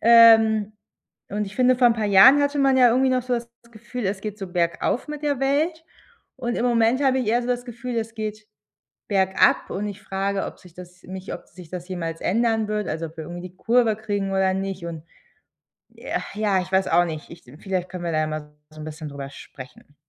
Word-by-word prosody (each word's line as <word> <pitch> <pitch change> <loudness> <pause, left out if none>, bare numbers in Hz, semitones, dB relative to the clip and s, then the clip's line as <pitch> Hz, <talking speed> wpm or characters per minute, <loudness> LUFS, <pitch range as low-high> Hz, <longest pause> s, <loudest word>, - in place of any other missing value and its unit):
Ähm, 225 -2 +6 0.6
und 210 +1 -1
ich 195 - -10
finde, 255 0 +4
vor 250 -1 +5
'n - - +3
paar 220 -2 -2
Jahren 205 +9 +8
hatte 285 0 0
man 270 -1 +4
ja 250 -1 +7
irgendwie 260 +3 +3
noch 255 -1 +1
so 250 0 -1
das 235 0 -4 0.2
Gefühl, 235 +1 -6
es 190 0 -2
geht 210 0 -6
so 195 - -5
bergauf 175 - 0
mit 300 0 -6
der 285 -3 -1
Welt. 315 +4 0 0.5
Und 240 0 -3
im 235 - -1
Moment 235 +2 +2
habe 265 -1 +3
ich 250 - -2
eher 240 +2 +2
so 240 - -5
das 245 0 -1
Gefühl, 240 0 -6
es 225 0 -3
geht 215 -1 -5 0.6
bergab 190 -2 +2
und 205 +2 -3
ich 205 0 -9
frage, 195 0 -2
ob - - -9
sich 180 -2 -17
das 180 0 -13
nicht 190 +1 -7
ob - - -8
sich 175 -2 -14
das 180 -1 -6
jemals 165 -3 -4
ändern 225 +1 +1
wird 210 -1 -2
also, 160 +1 -3
ob 160 - -14
wir 160 - -5
irgendwie 175 +3 -7
die 180 - -28
Kurve 230 +1 +2
kriegen 205 -2 -3
oder 190 0 +2
nicht 195 -2 -4
und 165 -2 -7 0.9
äh, - - -3
ja, 205 -2 +1
ich 185 - -9
weiß 190 0 +2
auch 175 - +4
nicht, 155 -3 -6
ich 170 - -13 0.2
vielleicht 185 -2 -2
können 180 -1 -7
wir 170 - -1
da 155 0 +1
mal 150 -1 -6 0.2
so 155 0 -11
'n - - -7
bisschen 155 0 -7
darüber 140 -1 -7
sprechen. 135 +1 -13
205 Hz, 225 wpm, -23 LUFS, 180-240 Hz, 0.9 s, Jahren